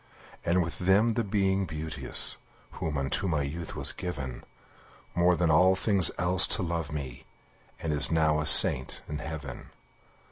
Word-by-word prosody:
And 90 +2 +1
with 85 - -7
them 100 +5 +2
the 115 - -2
Being 95 -2 -1
Beauteous, 80 0 -1 0.3
Who 80 - -5
unto 70 +8 -2
my 75 -5 -1
youth 80 +4 -7
was - - +3
given, 70 -8 -7 0.7
More 90 +1 +2
than 85 -1 0
all 90 +4 +4
things 95 -3 +2
else 90 +1 +2
to 100 - -3
love 85 -3 -4
me, 65 -5 -7 0.5
And 80 -2 -3
is 70 -3 +2
now 80 -2 +1
a 75 - -2
saint 65 -3 +6
in 75 0 -6
heaven. 75 -4 -8
80 Hz, 155 wpm, -27 LUFS, 75-90 Hz, 0.7 s, saint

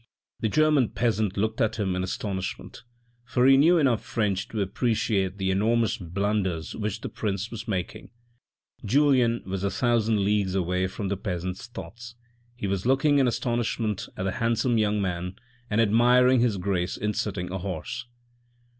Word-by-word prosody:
The 110 - 0
German 150 -3 +3
peasant 110 -5 0
looked 110 +2 0
at 110 0 +1
him 95 -4 -1
in 90 - -1
astonishment; 95 +1 -4 0.4
for 125 +1 +1
he 135 0 +7
knew 165 +6 +5
enough 130 -8 +2
French 100 -4 -1
to 110 - -5
appreciate 100 -2 0
the 95 -1 0
enormous 115 +3 +1
blunders 95 -2 -2
which 105 0 -3
the - - -4
prince 100 0 -3
was 115 -1 -7
making. 95 -5 -4 0.7
Julien 125 -1 +3
was 95 0 -4
a 100 - +1
thousand 110 -1 +1
leagues 100 -2 +1
away 90 0 0
from 95 +1 -4
the 100 - -1
peasant's 90 +2 -4
thoughts. 120 0 -9 0.4
He 120 - -5
was 100 +2 -1
looking 140 +2 +3
in 135 - +4
astonishment 115 -3 -1
at 95 - -3
the 95 - 0
handsome 115 +2 +1
young 105 -1 +1
man 90 -1 -3 0.3
and 105 - +1
admiring 125 +3 +5
his 115 -4 +2
grace 90 -1 -1
in 105 0 -1
sitting 95 -4 -3
a 95 - -3
horse. 95 +6 -5
105 Hz, 165 wpm, -26 LUFS, 95-120 Hz, 0.7 s, he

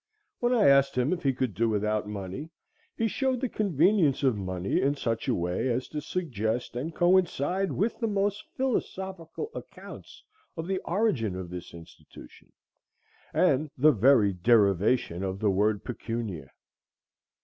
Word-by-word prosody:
When 240 0 +1
I 235 -5 +4
asked 140 -1 +4
him 125 +7 +2
if 175 - -4
he 135 - +2
could 130 -4 -2
do 115 +4 +1
without 105 0 0
money, 105 - -6 0.5
he 225 - +1
showed 260 +3 0
the 260 - -1
convenience 180 - +2
of 130 -4 +3
money 95 -1 -2
in 140 +2 +1
such 115 -3 -2
a 125 - +2
way 90 +7 -1
as 125 +2 -1
to 150 - -4
suggest 120 - -3
and 155 +7 -4
coincide 180 0 +2
with 220 +4 -1
the 230 - 0
most 205 0 -1
philosophical 190 - -3
accounts - - -11 0.3
of 165 - -3
the 190 +1 -1
origin 170 - 0
of 90 -2 -6
this 90 -1 -7
institution, 85 -1 -15 0.8
and 150 +3 +2
the 150 +4 +6
very 115 -4 +4
derivation 100 -1 +2
of 95 -1 -3
the 105 0 +1
word 105 +2 +1
pecunia. 110 - -5
130 Hz, 150 wpm, -28 LUFS, -, 0.8 s, the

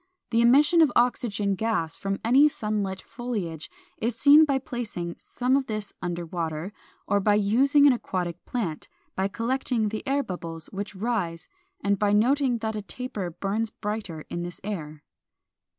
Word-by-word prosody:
The 230 0 +3
emission 295 +8 +6
of 305 -5 +5
oxygen 215 -5 +1
gas 190 -6 -1
from 195 0 -2
any 265 +6 +6
sun 215 -6 -2
lit 190 -1 -3
foliage 205 -11 -5 0.3
is 230 +1 -1
seen 290 +6 +7
by 280 -3 +1
placing 225 -10 -5
some 255 +1 0
of 275 -1 0
this 215 -2 -4
under 175 -1 -3
water, 165 +2 -4 0.3
or 205 - +2
by 205 +1 +3
using 260 +8 +4
an 280 - +7
aquatic 180 -7 -3
plant, 195 -12 -3 0.3
by 190 +1 +1
collecting 230 +1 -1
the 215 +1 -4
air 280 +1 +2
bubbles 165 -5 -7
which 200 +1 -5
rise, 190 -6 -2 0.4
and 200 0 +1
by 205 -1 +2
noting 250 +3 +3
that 220 -1 -2
a 210 - -3
taper 205 -4 -5
burns 200 +6 -2
brighter 210 -8 -5
in 175 - -4
this 175 0 -6
air. 155 -7 -5
210 Hz, 165 wpm, -26 LUFS, 180-245 Hz, 0.4 s, seen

